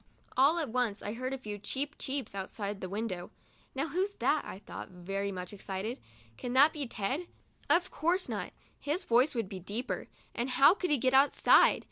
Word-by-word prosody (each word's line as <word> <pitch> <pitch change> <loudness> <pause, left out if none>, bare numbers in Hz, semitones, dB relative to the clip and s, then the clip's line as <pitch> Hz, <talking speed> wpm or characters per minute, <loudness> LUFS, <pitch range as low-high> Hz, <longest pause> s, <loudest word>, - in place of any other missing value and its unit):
All 280 +6 +5
at 315 -6 -1
once 235 -3 -1
I 205 - -3
heard 255 +2 -3
a 270 - -2
few 210 -5 -6
"cheep, 275 +8 -3
cheeps" 270 -6 -3
outside 200 +1 -4
of - - -16
the 185 - -5
window. 195 -3 -3 0.5
"Now, 280 +4 -1
who 350 +6 0
is 405 +1 -1
that?" - - +1
I - - -7
thought, 200 - -8
very 195 +2 -3
much 180 0 -6
excited; 200 +4 -4 0.4
"can 245 - -4
that 285 +4 +6
be 290 -4 -3
Ted? 260 - -2 0.4
Of 355 +2 +3
course 345 +5 +1
not; - - -4 0.3
his 310 +6 -1
voice 250 +1 +3
would 230 -4 -1
be 190 0 -7
deeper, 205 +8 -3 0.3
and 240 +2 -2
how 270 +6 +7
could 375 -2 -2
he 295 - +4
get 255 +1 +1
outside? 275 +2 +6
250 Hz, 200 wpm, -31 LUFS, 200-285 Hz, 0.5 s, how